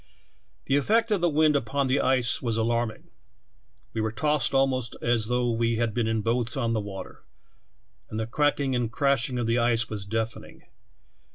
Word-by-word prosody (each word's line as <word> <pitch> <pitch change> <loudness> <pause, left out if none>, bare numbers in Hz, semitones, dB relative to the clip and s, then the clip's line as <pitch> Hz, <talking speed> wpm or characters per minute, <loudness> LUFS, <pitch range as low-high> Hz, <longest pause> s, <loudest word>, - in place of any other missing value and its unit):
" - - -40
The 140 - +2
effect 225 +10 +2
of 200 -4 +2
the 175 - +3
wind 155 0 +3
upon 140 +1 0
the 130 +2 +1
ice 130 -2 +1
was 115 -3 -1
alarm 115 +1 +1
ing. 110 - -13 0.9
We 115 - -1
were 110 0 -1
tossed 150 +3 0
almost 130 -3 +1
as 115 -2 +1
though 125 0 +1
we 115 0 +1
had 115 -1 0
been 120 -1 0
in 110 -1 0
boats 115 +2 0
on 115 -3 0
the 110 - 0
water, 100 -1 -8 0.9
and 110 - -4
the 110 - -1
cracking 140 +2 +1
and 120 -2 -1
crashing 130 0 +1
of 120 - -1
the 115 +1 +1
ice 115 -1 +1
was 100 -2 -5
deafening. 110 +1 -4
120 Hz, 190 wpm, -26 LUFS, 115-135 Hz, 0.9 s, the